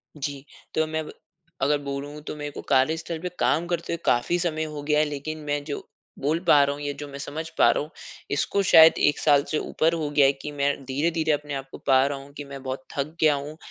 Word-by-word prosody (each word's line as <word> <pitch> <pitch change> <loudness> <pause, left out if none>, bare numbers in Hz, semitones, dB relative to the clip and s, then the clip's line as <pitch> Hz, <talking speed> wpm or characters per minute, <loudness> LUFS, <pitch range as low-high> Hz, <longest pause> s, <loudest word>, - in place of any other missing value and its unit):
जी, 140 -1 -5 0.3
तो 160 - +2
मैं 155 0 -3
ब - - -8 0.5
अगर 145 +2 +3
बोलूँ 140 +1 -5
तो - - -4
मेरे 150 -1 -5
को - - -7
कार्यस्थल 160 +5 +1
पे 180 +2 -4
काम 165 +3 +2
करते 170 -1 -2
हुए - - -1
काफ़ी 120 +9 +2
समय 160 -3 -1
हो 150 -2 -5
गया 150 0 +2
है। 155 - +4
लेकिन, 150 +2 -5
मैं 145 -1 -2
जो 145 - -5 0.4
बोल 150 +4 0
पा 145 -1 +7
रहा 140 0 0
हूँ, 145 - -9
या 145 0 -2
जो 145 - -6
मैं 140 0 -9
समझ 155 +3 -5
पा - - +6
रहा - - 0
हूँ 150 - -10 0.4
इसको 150 +7 +1
शायद 160 -3 +8 0.2
1 - - -3
साल 145 -2 +4
से 155 - +1
ऊपर 160 +2 0
हो 155 -3 -2
गया 145 -1 +4
है 135 - +6
कि 150 - -5
मैं 140 0 +3
धीरे-धीरे 160 +4 0
अपने 145 0 -2
आप 135 0 -4
को - - -8
पा 130 0 +5
रहा 140 -1 -3
हूँ 140 - -15
कि 145 - -5
मैं 135 - -7
बहुत 130 0 -4
थक 150 +4 -2
गया 155 -2 +5
हूँ। 145 +2 -6
145 Hz, 250 wpm, -25 LUFS, 140-155 Hz, 0.5 s, शायद